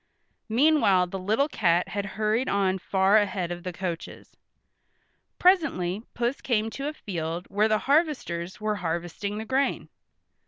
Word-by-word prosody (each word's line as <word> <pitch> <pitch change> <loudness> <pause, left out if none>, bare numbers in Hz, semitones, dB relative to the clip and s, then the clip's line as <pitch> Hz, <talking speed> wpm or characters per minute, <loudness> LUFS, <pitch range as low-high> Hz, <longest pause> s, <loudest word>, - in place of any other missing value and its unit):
Meanwhile 230 -7 +4
the 190 +2 -6
little 220 +10 +1
cat 175 - +1
had 200 +1 -3
hurried 220 +4 +1
on 190 -1 +1
far 190 +3 +3
ahead 190 -4 0
of 175 0 -5
the 180 +1 -5
coaches. 175 -2 -6 1.0
Presently 265 - +2
Puss 240 +3 -1
came 225 -3 0
to 275 +5 -4
a 300 - -3
field 170 - -4
where 210 +2 +3
the 215 -1 +2
harvesters 270 - 0
were 215 -1 -1
harvesting 175 +3 -3
the 220 - -5
grain. 265 +3 0
205 Hz, 145 wpm, -26 LUFS, 180-240 Hz, 1.0 s, Meanwhile